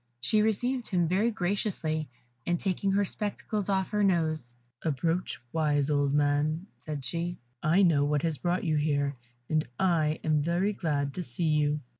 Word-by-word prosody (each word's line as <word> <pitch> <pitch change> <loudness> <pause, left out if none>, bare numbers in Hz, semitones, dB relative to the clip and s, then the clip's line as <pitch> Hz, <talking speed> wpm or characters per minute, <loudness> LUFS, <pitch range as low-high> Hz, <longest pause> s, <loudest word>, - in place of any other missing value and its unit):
She 210 - +2
received 245 +4 0
him 175 -4 +1
very 195 +7 +2
graciously, 180 - -1 0.4
and 175 -1 +1
taking 195 0 0
her 200 +1 +3
spectacles 205 0 -3
from 200 - +2
off 190 0 -1
her 210 -1 +1
nose, 155 -10 +1 0.3
"Approach, 165 +4 -1
wise 150 -2 +2
old 145 -1 +2
man," 145 +3 +1
said 150 -3 -5
she. 170 +6 -2 0.2
"I 170 +6 +4
know 155 -6 +4
what 145 0 +1
has 160 -4 -1
brought 175 +1 0
you 155 -3 +1
here, 145 -2 +1 0.3
and 155 0 +1
I 160 -4 +2
am 155 -1 +2
very 175 +6 +1
glad 145 -6 -1
to 185 - -4
see 160 +2 -2
you." 150 -1 +2
160 Hz, 170 wpm, -29 LUFS, 150-190 Hz, 0.4 s, I